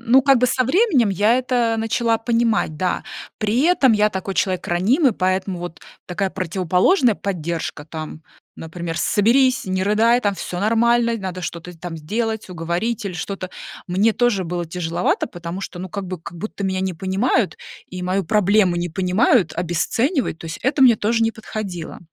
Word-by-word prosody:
Ну, 240 +3 +4
как 275 -1 +5
бы 250 - +3
со 255 +1 +1
временем 285 - +3
я 205 +5 +3
это, 245 -3 +1
э, - - -2
начала 225 +1 0
понимать, 230 -7 0
да 180 +2 -1 0.4
при 220 +5 +1
этом 310 -7 +4
я 210 0 +3
такой 190 0 -4
человек 185 -5 0
ранимый, 230 - +3
поэтому 185 0 -1
вот 175 -1 -7 0.3
такая 190 +2 -2
противоположная 185 - +2
поддержка, 170 -5 -4
там, 155 0 -8 0.3
например: 165 0 -6
"Соберись, 250 +9 +3
не 185 0 -1
рыдай, 225 +5 +3
там 205 -4 0
всё 180 -1 -5
нормально, 235 +2 +2
надо 185 -3 -5
что-то 175 +1 -6
с - - -16
там 175 -1 -6
сделать, 220 +8 -3
уговорить 180 +7 -2
или 185 - -4
что-то". 185 +2 -5 0.4
Мне 200 +5 +2
тоже 240 -6 +1
было 175 +1 -3
тяжеловато, 170 +1 -1
потому 175 +2 -7
что, 190 - -7
ну, 185 - -6
как 200 +2 -5
будто 185 +3 -6
меня 190 -1 -1
не 190 -1 -2
понимают, 195 +5 0 0.3
и 180 0 -7
мою 185 +2 0
проблему 200 -1 +3
не 175 0 -2
понимают, 185 +2 +2
обесценивают, 175 - -1
то 165 - -9
есть 160 - -6
это 270 +2 0
мне 250 -3 +8
тоже 225 +2 +1
не 225 - 0
подходило. 200 -7 -6
195 Hz, 170 wpm, -21 LUFS, 175-230 Hz, 0.4 s, мне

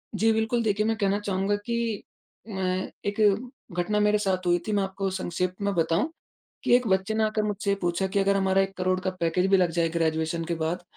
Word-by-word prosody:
जी, 225 +2 +3
बिल्कुल। 220 +2 +1
देखिए 210 -1 +1
मैं 225 0 +1
कहना 200 -1 +1
चाहूँगा 200 0 0
कि 235 -3 -2 0.5
म 185 -1 -1 0.2
एक 205 +1 -2 0.6
घटना 210 +4 +1
मेरे 210 0 +3
साथ 190 -3 -1
हुई 175 0 +4
थी, 215 - 0
मैं 200 -1 +2
आपको 195 0 -2
संक्षेप 180 -1 -2
में 200 0 0
बताऊँ 165 - +1 0.5
कि, - - +5
एक 245 -1 +3
बच्चे 190 +3 +1
ने 220 0 +2
आकर 215 0 0
मुझसे 205 -1 -1
ये 200 - +2
पूछा 175 +2 0
कि 190 +1 -1
अगर 195 0 +3
हमारा 190 0 +2
1 195 0 -4
करोड़ 185 0 +1
का 185 - -1
पैकेज 170 +3 +2
भी 195 - +6
लग 180 -3 +2
जाए, 165 0 +1
ग्रेजुएशन 160 0 -1
के 170 - -2
बाद, 165 +2 -2
195 Hz, 220 wpm, -26 LUFS, 180-210 Hz, 0.6 s, भी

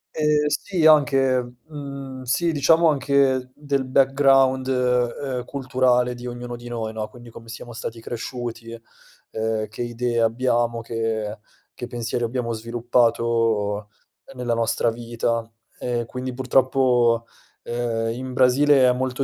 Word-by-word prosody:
Ehm, 150 -1 +2
sì, 170 +2 -1
anche, 135 -5 +4
mhmm, 140 -3 -8
sì, 165 +7 0
diciamo 160 +3 +4
anche 135 -3 +2
del 140 -2 -1
background, 135 0 +3
uhm, 125 0 0
culturale 125 -2 +1
di 120 0 -8
ognuno 120 0 -6
di 120 0 -11
noi, 115 -2 -4
no. 110 -1 -4
Quindi 120 +1 -14
come 115 0 -13
siamo 120 +1 -9
stati 115 0 -6
cresciuti, 115 0 -6 0.5
uhm, 110 -1 -2
che 110 - -8
idee 120 0 -1
abbiamo, 120 0 +1
che 110 -2 -3 0.4
che 125 - -6
pensieri 120 0 -3
abbiamo 120 0 -2
sviluppato 115 -2 0 0.5
nella 125 -2 -1
nostra 115 0 +1
vita, 115 0 -3 0.3
e 120 -1 -2
quindi 125 +2 -5
purtroppo, 125 -2 +2 0.4
uhm, 115 -1 -2
in 130 +1 -6
Brasile 130 +1 +5
è 125 - +4
molto 130 +1 -2
125 Hz, 130 wpm, -23 LUFS, 115-130 Hz, 0.5 s, Brasile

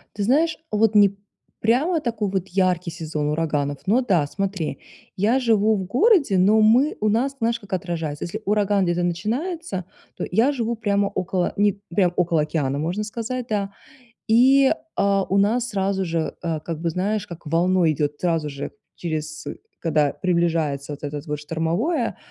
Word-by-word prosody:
Ты 205 - -2
знаешь, 305 +9 +2
вот 215 0 +2
не 200 -1 +5 0.4
прямо 290 +10 +2
такой 230 -7 -2
вот 190 -1 -2
яркий 180 -2 +1
сезон 155 -3 -3
ураганов, 150 -2 -1
но 220 +6 +3
да, 180 - +2
смотри. 190 -2 -3 0.4
Я 225 +7 +2
живу 220 -3 +3
в 190 - -2
городе, 280 - +3
но 210 +4 +5
мы 245 +7 +4
у 215 - +2
нас, 265 +6 +1
знаешь, 230 0 0
как 200 -3 -11
отражается- 165 -5 -3
если 210 +6 -5
ураган 205 -1 +2
где-то 175 0 0
начинается, 220 - -2 0.3
то - - -3
я 235 +9 +3
живу 235 -2 -2
прямо 200 -2 +1
около 185 -1 -1
не 205 -1 +2
прям 180 -2 +2
около 170 -3 +2
океана, 140 -3 -1
можно 175 +7 -2
сказать, 230 +3 -4
да. 200 -2 -1 0.6
И, 265 +4 +5 0.2
а, 200 -1 +2
у 195 - 0
нас 230 +5 +2
сразу 195 -1 -1
же, 165 -1 -2
э, 165 -2 -1
как 160 0 -5
бы, 170 - 0
знаешь, 200 +4 -1
как 170 -1 -11
волной 170 +1 +3
идёт 145 0 -2
сразу 165 -4 0
же, 140 0 -6 0.2
через 155 -2 -4 0.4
когда 155 -4 +2
приближается 165 -6 0
вот 145 - -8
это 145 0 -4
вот 150 -2 -3
штормовое, 170 - -1
190 Hz, 165 wpm, -23 LUFS, 165-220 Hz, 0.6 s, не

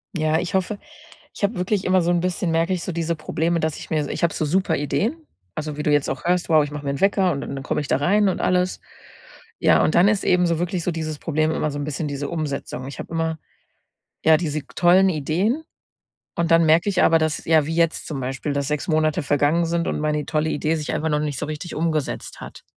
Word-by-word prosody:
Ja, 155 -1 +1
ich 180 - -4
hoffe 190 +2 -1 0.5
ich - - -10
habe 200 +2 +1
wirklich 185 +2 -1
immer 185 0 +3
so 170 - 0
'n 175 - +2
bisschen, 180 0 -1
merke 165 +3 +1
ich 175 - -2
so - - -3
diese 170 0 -1
Probleme, 165 +2 -1
dass 155 -1 -1
ich - - -10
mir 155 -2 0
so 145 - -6
ich - - -4
habe 170 - +2
so 155 - -1
super 170 +1 +1
Ideen, 230 - -1 0.3
also, 155 -1 -4
wie 150 - -2
du 150 - +1
jetzt 145 -1 +2
auch 135 - -4
hörst: 175 0 +1
„Wow, 155 -2 +5
ich 145 - -6
mache 150 0 -6
mir 140 - 0
'n 140 - -5
Wecker 195 -2 +3
und 140 - -3
d - - -6
dann 135 -1 -5
komme 150 - -1
ich 140 - -6
da - - +2
rein 200 +8 +3
und 185 - -2
alles.” 180 0 +1 0.8
Ja, - - +4
und - - +1
dann 175 +3 +6
ist 210 -1 +1
eben 180 -1 +3
wirklich 175 0 -2
so 180 - 0
dieses 155 -2 -4
Problem 155 -1 0
immer 155 - -1
so 145 - -5
'n - - -2
bisschen 150 +1 -3
diese 140 0 -4
Umsetzung. 140 -5 -4
Ich 140 - -8
habe - - -7
immer, 160 -1 -1 0.9
ja, 160 -1 +6
diese 155 -3 -2
g 140 - -28
tollen 185 +2 +5
Ideen 185 - 0 0.7
und 170 0 0
dann 165 0 +5
merke 160 +5 +4
ich 190 -2 +1
aber, 165 - +5
dass 155 -1 -1
ja, 160 -2 +4
wie 160 +2 -3
jetzt 165 -1 +1
zum 145 -4 -4
Beispiel, 135 +3 -3
dass 140 -1 -1
6 150 +2 -2
Monate 155 +1 +1
vergangen 145 +4 +2
sind 170 0 -1
und - - -1
meine 150 -1 -1
tolle 155 0 0
Idee 155 +2 0
sich 150 -2 -3
einfach 160 +1 -1
noch 150 -1 +1
nicht 150 -3 -3
so - - -2
richtig 155 +3 -6
umgesetzt 155 -2 -2
hat. - - -10
160 Hz, 255 wpm, -22 LUFS, 150-175 Hz, 0.9 s, dann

